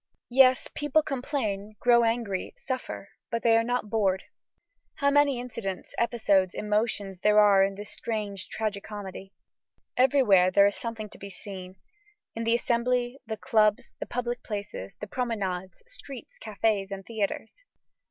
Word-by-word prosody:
Yes, 255 0 +5
people 295 +1 +2
complain, 240 -8 -3
grow 240 -1 +5
angry, 225 -5 -1
suffer, 255 -6 -5 0.2
but 230 -1 -2
they 230 -1 +5
are 230 - +4
not 245 -1 -1
bored. 195 -4 +1 0.7
How 280 0 +2
many 285 -3 +4
incidents, 230 -6 -5
episodes, 205 -6 +2
emotions, 210 -3 -1
there 210 +2 +5
are 200 -2 +6
in 195 0 0
this 205 +1 -8
strange 210 -4 -4
tragi 215 -2 -2
comedy! 195 -2 -8 0.6
Everywhere 245 -9 +5
there 200 +2 +6
is 200 - +2
something 225 -2 -5
to - - -14
be 200 - -8
seen; 185 -1 -9 0.6
in 230 0 -4
the 230 +1 +4
Assembly, 245 +2 0
the 220 -1 -3
clubs, 215 -4 +2
the - - -5
public 245 0 -3
places, 200 - -6
the - - -4
promenades, 195 -6 -3
streets, 285 - -10
cafés, 210 -2 0
and 195 -1 -6
theatres. 220 - -3
220 Hz, 145 wpm, -27 LUFS, 200-245 Hz, 0.7 s, are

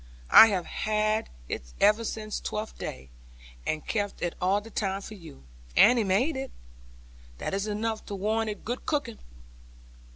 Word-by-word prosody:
I 225 - +11
have 190 -5 -1
had 215 0 0 0.2
it - - -3 0.2
ever 210 +3 +4
since 215 -1 -4
Twelfth 215 +1 -5
Day, 65 0 -7 0.6
and 155 -1 -2
kept 205 -4 -2
it 175 - -1
all 190 +3 +3
the 225 +2 -13
time 195 -2 -2
for 215 - -9
you. 165 - -13 0.3
Annie 240 -1 +7
made 215 +11 +1
it. 265 0 -4 0.9
That - - -4
is 200 +2 -1
enough 215 +1 -3
to 200 - -4
warrant 220 +3 0
it 210 - -7
good 245 +3 -4
cooking.' 295 - -1
210 Hz, 160 wpm, -28 LUFS, 195-225 Hz, 0.9 s, I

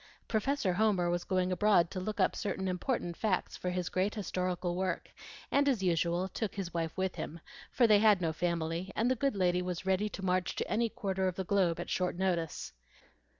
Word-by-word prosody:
Professor 225 -2 +1
Homer 190 -3 +2
was 175 0 -1
going 185 -1 0
abroad 180 -2 +3
to 185 - -3
look 210 +3 -4
up - - +3
certain 190 -2 -2
important 180 -1 -1
facts 200 -2 -1
for 180 - -3
his 180 0 -2
great 190 +4 0
historical 180 -3 -2
work, 185 -1 -2 0.4
and 285 0 +4
as 235 -8 0
usual 175 +1 +1
took 210 +2 -4
his 190 -4 -4
wife 165 -1 -2
with 190 -1 -1
him; 170 - -5 0.3
for 245 - +4
they 210 -2 +6
had 210 -2 +5
no 165 -3 0
family, 170 +2 -2
and 235 +3 +2
the - - +3
good 275 -1 0
lady 180 -2 +2
was 180 -1 -4
ready 190 +2 +1
to 195 -1 -6
march 180 0 0
to - - -2
any 230 +3 +1
quarter 190 -2 -1
of 185 - -2
the 190 - -2
globe 180 -3 +1
at 175 - -4
short 180 -1 -1
notice. 175 - -1
185 Hz, 205 wpm, -32 LUFS, 175-205 Hz, 0.4 s, they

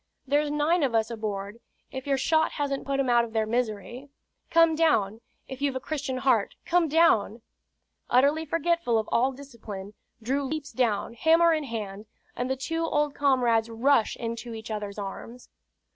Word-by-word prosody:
There's 290 +2 +1
nine 300 +4 +1
of 260 -5 +1
us 225 +1 +1
aboard, 210 -1 -5 0.3
if 265 +1 -7
your 275 -1 +2
shot 315 +4 +2
hasn't 280 -2 -3
put 275 0 0
'em 270 - +1
out 240 -1 +4
of 230 -1 -7
their 220 -1 +1
misery. 240 +3 -3 0.4
Come 330 -1 +5
down 230 -10 +1 0.3
if 265 0 -8
you've 280 -2 0
a - - -1
Christian 275 -2 -4
heart, 255 -5 +1
come 345 -1 +2
down!" 245 -9 +3 0.7
Utterly 280 +6 +3
forgetful 330 -5 0
of 220 - -1
all 255 +3 +2
discipline, 225 -7 -9 0.3
Drew 265 +5 -1
leaps 295 +1 -4
down, 230 -3 0
hammer 330 +7 +4
in 310 -2 -1
hand, 215 -3 -6 0.3
and 245 +1 -3
the 265 - 0
two 325 +5 -2
old 295 -3 0
comrades 245 -6 +2
rush 230 +1 +2
into 230 0 -5
each 220 0 -8
other's 210 -1 -5
arms. 220 +5 -8
255 Hz, 170 wpm, -27 LUFS, 225-290 Hz, 0.7 s, Come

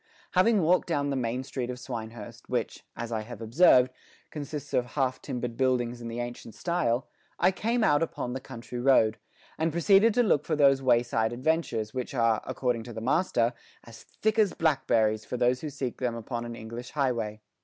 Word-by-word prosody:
Having 195 +1 +4
walked 180 +3 +3
down 145 -4 0
the - - -1
main 125 0 -2
street 125 -2 -4
of 125 - -4
Swinehurst, 115 -4 -8
which, - - -2
as 115 0 -5
I 110 -1 -1
have 115 0 -9
observed, 125 +2 +5 0.4
consists 145 -1 -6
of 125 - +3
half 130 0 -2
timbered 120 -2 -4
buildings 125 -2 0
in 115 - -6
the 115 +1 -5
ancient 120 -2 -6
style, 145 -6 0 0.3
I 180 +2 +4
came 230 +5 0
out 145 -7 +4
upon 125 -6 -3
the 130 - -3
country 125 -2 -8
road, 120 -4 +4 0.4
and 160 +1 +1
proceeded 195 +6 +4
to 245 - +4
look 150 -10 +2
for 160 - -1
those 140 -2 +4
wayside 120 -3 +2
adventures, 120 -5 -1
which 130 +1 -4
are, 115 -3 +2
according 125 -3 -1
to 120 - -8
the 110 - -5
master, 125 -2 +1 0.3
as 115 -1 -13
thick 220 +1 -1
as 205 -4 +3
blackberries 110 -9 +2
for 125 - -5
those 125 +1 +2
who 155 - -4
seek 135 -3 -5
them 125 -2 -1
upon 115 +1 -5
an 120 0 -6
English 115 +2 -8
highway. 120 -7 -1
125 Hz, 190 wpm, -28 LUFS, 115-150 Hz, 0.4 s, observed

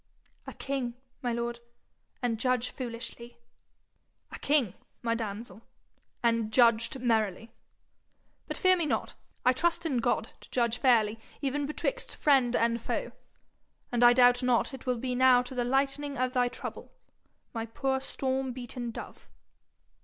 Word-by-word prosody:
'A - - -6
king, 265 -4 -3 0.3
my 245 -3 -1
lord, 235 0 -3 0.6
and 230 -3 0
judge 250 0 +1
foolishly!' 235 -1 -6 0.9
'A - - -8
king, 280 -10 +2 0.3
my 230 -1 +1
damsel, 225 0 -5 0.6
and 230 -2 +1
judged 230 +1 +4
merrily. 225 -3 0 1.0
But - - -4
fear 370 -2 +5
me 340 -4 -1
not; - - -1 0.3
I 255 - +6
trust 340 +5 0
in 280 -6 0
God - - 0
to - - -14
judge 235 -1 +1
fairly 225 -4 +3 0.2
even 280 +1 -1
betwixt - - -2
friend 260 -5 +3
and 235 0 +1
foe, - - -3 0.8
and 240 0 +2
I 240 0 +8
doubt 245 0 +5
not 250 +2 +2
it 265 - -9
will 250 -1 +1
be 250 +2 -3
now 250 0 +5
to 250 - -8
the 250 -1 0
lightening 275 +3 0
of 255 0 0
thy 250 -2 +3
trouble, - - -7 0.6
my 225 -1 -3
poor 265 +3 -1
storm 265 -1 -2
beaten 245 -1 -5
dove.' 230 - -9
245 Hz, 145 wpm, -29 LUFS, 235-265 Hz, 1.0 s, I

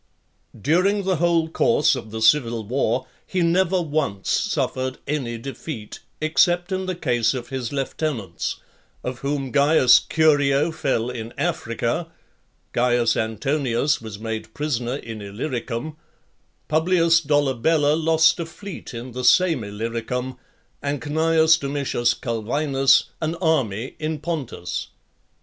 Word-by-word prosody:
XXXVI. - - -16
During 185 +7 +2
the 190 -2 +1
whole 170 0 +2
course 150 -3 +3
of 120 -4 -7
the 110 +1 -4
civil 115 -2 +3
war, 130 +1 0 0.2
he 185 -2 0
never 180 +2 +2
once 145 - -2
suffered 130 0 -1
any 135 -5 -2
defeat, 120 -2 -7 0.2
except 175 +3 +2
in 190 0 -2
the 185 - -2
case 125 -7 +1
of 120 -1 -6
his 130 -3 -4
lieutenants; 135 - -3 0.5
of 125 -1 -4
whom 140 -2 -2
Caius 140 -3 +6
Curio 150 -1 +2
fell 125 -6 -1
in 115 -1 -7
Africa, 140 -1 -1 0.7
Caius 120 -1 +2
Antonius 130 +4 0
was 110 -2 -7
made 110 0 -6
prisoner 125 -4 -2
in 115 -6 -7
Illyricum, 120 +6 -4 0.7
Publius 165 +1 +3
Dolabella 145 0 +2
lost 160 +1 +3
a 165 - -3
fleet 175 -5 -9
in 120 +2 -7
the 125 +1 -5
same 165 - +4
Illyricum, 115 +5 -4 0.5
and 145 0 -2
Cneius 160 +3 +3
Domitius 140 -4 0
Culvinus, 135 +4 +2 0.2
an 160 +1 -1
army 135 - 0
in 155 0 -2
Pontus. 140 - -4
140 Hz, 125 wpm, -23 LUFS, 120-160 Hz, 0.7 s, Caius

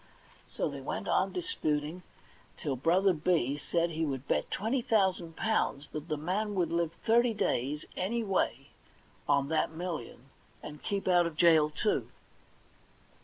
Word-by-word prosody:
So - - -2
they - - -6
went - - -4
on - - +2
disputing 165 - -2 0.6
till 140 -3 -2
Brother 180 +8 +3
B 155 -4 +1
said 170 +3 0
he 160 0 -2
would 135 -3 -3
bet - - 0
twenty 230 +6 0
thousand 190 -7 +1
pounds 180 -10 0
that 155 +1 -6
the 155 - -1
man 200 +7 -1
would 175 -4 +1
live 170 -1 0
thirty 235 0 +4
days, 145 -2 -1
any 225 +6 -1
way, 145 - -1 0.6
on 140 -1 +3
that 160 - +1
million, 160 -6 -6 0.3
and 150 0 -8
keep 200 -1 -2
out 175 -2 +4
of 165 - -7
jail, 160 -3 +5
too. 180 +8 -1
170 Hz, 150 wpm, -31 LUFS, 150-195 Hz, 0.6 s, jail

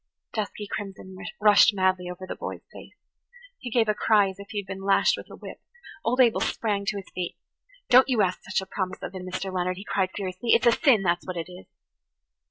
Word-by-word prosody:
Dusky 210 -1 -3
crimson 195 -2 -7 0.2
rushed 210 +1 +6
madly 185 -1 +1
over 180 +1 -7
the - - -6
boy's - - -7
face. - - -12 0.6
He 250 - -6
gave 230 -1 +2
a 215 - +3
cry 210 -2 +3
as 190 +1 -10
if 200 - -10
he 210 - -6
had - - -18
been 195 0 -7
lashed 200 - +3
with - - -10
a - - -10
whip. - - -10 0.4
Old 250 +3 0
Abel 240 -3 +5
sprang 205 -3 -1
to 205 - 0
his 195 - -7
feet. 180 -1 -4 0.5
[Page - - -4
91] 250 - +11
"Don't 265 - +2
you 240 -4 +3
ask 185 -1 -1
such 190 0 -1
a - - -7
promise 190 -1 -4
of - - -5
him, 185 -1 -7
Mr. 185 +1 -4
Leonard," 180 0 -1
he 195 - -9
cried 190 -2 0
furiously. 195 +3 -1
"It's - - +2
a 235 - +7
sin, 230 -5 +4
that's 175 -1 0
what 185 -1 -4
it 170 +2 -5
is. 180 +1 -12
195 Hz, 235 wpm, -26 LUFS, 185-215 Hz, 0.6 s, 91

